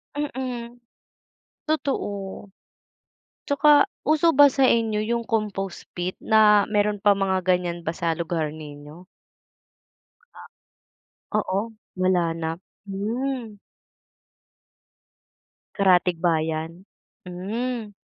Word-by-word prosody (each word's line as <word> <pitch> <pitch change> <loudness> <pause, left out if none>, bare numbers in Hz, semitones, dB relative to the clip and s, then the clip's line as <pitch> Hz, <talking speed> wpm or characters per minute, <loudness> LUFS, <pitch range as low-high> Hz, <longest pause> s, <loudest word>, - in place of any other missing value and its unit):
Mm, 255 -4 -4 0.9
totoo. 305 -6 -1 1.4
'Tsaka 290 0 +5 0.2
uso 310 +2 +3
ba 290 - +9
sainyo 230 -5 +2
yung 235 +2 -1
compost 205 -4 -3
pit 180 +1 -2
na, 210 -2 +5
meron 210 -1 +1
pa 205 -2 +5
mga 195 -1 +1
gan'yan 180 -2 +1
ba - - 0
sa 165 -1 0
lugar 160 -2 -2
ninyo? 150 +2 -11 2.3
Oo, 210 +1 -1 0.2
wala 185 -1 +2
na, 165 0 -4 0.3
mm. 230 +3 -3 2.2
Karatig-bayan, 170 -3 +1 0.4
mm. 215 +5 -4
200 Hz, 80 wpm, -24 LUFS, 175-235 Hz, 2.3 s, ba